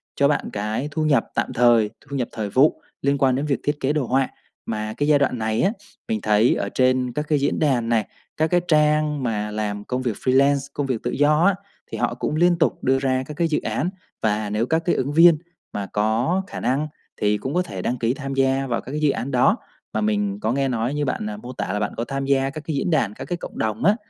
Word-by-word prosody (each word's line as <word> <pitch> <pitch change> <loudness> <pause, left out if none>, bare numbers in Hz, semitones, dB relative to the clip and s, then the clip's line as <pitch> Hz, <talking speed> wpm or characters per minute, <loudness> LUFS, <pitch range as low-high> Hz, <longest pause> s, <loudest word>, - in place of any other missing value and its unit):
cho 140 - +4
bạn 145 - 0
cái 105 +7 -2
thu 155 - -1
nhập 140 -6 +3
tạm - - -1
thời, 120 -3 +4 0.2
thu 140 - -4
nhập 125 -3 -1
thời 105 -2 -4
vụ 135 +8 +3 0.2
liên 140 +1 +2
quan 130 -2 +3
đến 140 - -1
việc 140 -3 0
thiết 145 0 -1
kế 135 +1 +1
đồ 150 -4 0
họa. 135 +1 +1 0.4
Mà 110 -1 -3
cái 145 - 0
giai 150 -1 +5
đoạn 130 -3 +1
này 110 0 0
á, 195 - +3 0.4
mình 225 -1 -1
thấy 105 +3 +3
ở - - -2
trên 130 -1 +2
các 150 +4 -2
cái 150 -2 +2
diễn 140 - 0
đàn 130 -7 +1
này, 115 -3 +1 0.3
các 160 +1 +2
cái 175 +1 +2
trang 150 -2 +2
mà 105 -3 -2
làm 105 -1 -3
công 125 0 -2
việc 120 -5 -1
freelance, 135 +3 +2
công 145 - -2
việc 125 -4 -2
tự - - -1
do 150 +3 +3
á, 200 -1 +4 0.4
thì - - -4
họ - - 0
cũng 150 - -2
liên 175 +1 +4
tục - - +1
đưa 135 +1 +3
ra 130 -1 0
các 150 - -7
cái 170 -1 +2
dự 150 - 0
án, 175 - -1 0.3
và 105 -1 0
nếu 105 +3 0
các 160 +5 +1
cái 175 - +2
ứng 140 +3 -1
viên 165 0 +7 0.4
mà 100 -1 -3
có 115 - +1
khả - - -6
năng 140 +4 0 0.3
thì 105 0 +2
cũng 130 +6 -4
có 180 - +2
thể 95 - -5
đăng 125 +6 -1
ký 115 +1 +1
tham 135 -1 -5
gia 135 0 +1
vào 120 -2 -1
các 130 - -9
cái 150 +1 -3
dự 150 - +4
án 135 - -4
đó. 125 -2 +4 0.4
Mà 110 - 0
mình 105 -1 0
có 110 +2 0
nghe 135 +2 +1
nói 120 +1 -1
như 145 0 -1
bạn, 105 -5 -2
à, 105 - -6
mô 125 +4 -8
tả 95 - -3
là 105 - -1
bạn 105 - -2
có 115 - -1
tham 135 +2 -3
gia 135 0 +2
các 155 +2 -7
cái 155 - -1
diễn 140 - -1
đàn, 140 - +1
các - - -8
cái 175 - -3
cộng - - -9
đồng 110 +4 -2
á 205 - +5
135 Hz, 265 wpm, -23 LUFS, 110-150 Hz, 0.4 s, viên